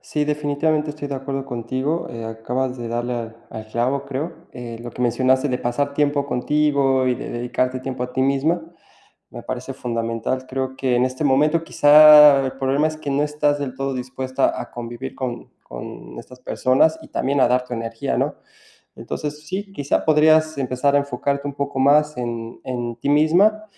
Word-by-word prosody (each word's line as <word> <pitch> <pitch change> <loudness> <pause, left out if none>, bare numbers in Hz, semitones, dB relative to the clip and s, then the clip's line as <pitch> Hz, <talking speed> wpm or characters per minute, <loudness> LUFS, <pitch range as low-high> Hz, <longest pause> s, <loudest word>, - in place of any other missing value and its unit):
Sí, 150 -1 -2
definitivamente 150 +1 0
estoy 145 -1 -7
de 140 - -3
acuerdo 135 0 -4
contigo, 130 +6 -3
eh, 115 -2 -7
acabas 125 +3 -3
de 120 - -5
darle 120 +1 -2
al 115 -1 -6
al 110 0 -8
clavo, 125 +5 -1
creo. 140 +5 -6
Eh, 120 -2 -7
lo 120 0 -7
que 125 - -5
mencionaste 130 +3 +2
de 125 -1 -1
pasar 140 +4 -2
tiempo 145 -1 +1
contigo 140 -1 +1
y 125 - +2
de - - -7
dedicarte 125 +2 -2
tiempo 130 -1 -4
a 125 - -8
ti 130 - 0
misma 140 +6 +1 0.7
me 120 - -9
parece 130 +2 -5
fundamental. 115 +1 -3
Creo 130 0 -3
que 130 -2 0
en 125 - +3
este 130 +3 -3
momento 150 +4 +3
quizá 150 -2 +8
el 130 - -2
problema 135 +3 +1
es 155 - -6
que 155 -2 -5
no 140 +1 +1
estás 150 -1 0
del 130 -3 -4
todo 135 0 -3
dispuesta 130 +1 -2
a - - -7
convivir 120 +2 -7
con 125 -2 -5
con - - -9
estas 125 0 -12
personas 135 +6 +2
y - - -13
también 140 +1 0
a - - +6
dar 125 0 +2
tu 125 - -5
energía, 115 0 -3
¿no? - - -1 0.6
Entonces, 150 0 -6
sí, 195 +4 -4
quizá 145 -6 -1
podrías 155 0 +4
empezar 130 +1 0
a - - +6
enfocarte 140 0 -2
un 140 - -4
poco 140 -1 -3
más 150 +3 +3
en 115 -2 -5
en 120 -2 -4
ti 120 - -4
misma, 180 +9 +4
135 Hz, 185 wpm, -21 LUFS, 125-150 Hz, 0.7 s, quizá